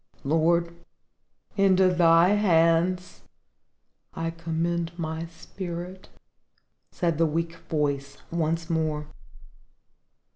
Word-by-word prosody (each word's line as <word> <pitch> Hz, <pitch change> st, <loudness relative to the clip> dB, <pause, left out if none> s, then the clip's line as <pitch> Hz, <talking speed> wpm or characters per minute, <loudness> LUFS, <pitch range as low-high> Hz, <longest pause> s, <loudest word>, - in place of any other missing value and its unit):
"Lord, 170 Hz, +3 st, +1 dB, 0.8 s
into 190 Hz, -2 st, +4 dB
Thy 170 Hz, 0 st, +5 dB
hands 180 Hz, -2 st, +2 dB, 0.9 s
I 165 Hz, 0 st, -2 dB
commend 170 Hz, +1 st, -3 dB
my 160 Hz, 0 st, -4 dB
spirit," 175 Hz, +2 st, -8 dB, 0.8 s
said 170 Hz, -3 st, -1 dB
the 165 Hz, -, +4 dB
weak 165 Hz, +2 st, -2 dB
voice 140 Hz, -2 st, -1 dB
once 165 Hz, 0 st, -1 dB
more. 155 Hz, -3 st, -1 dB
165 Hz, 80 wpm, -26 LUFS, 160-175 Hz, 0.9 s, Thy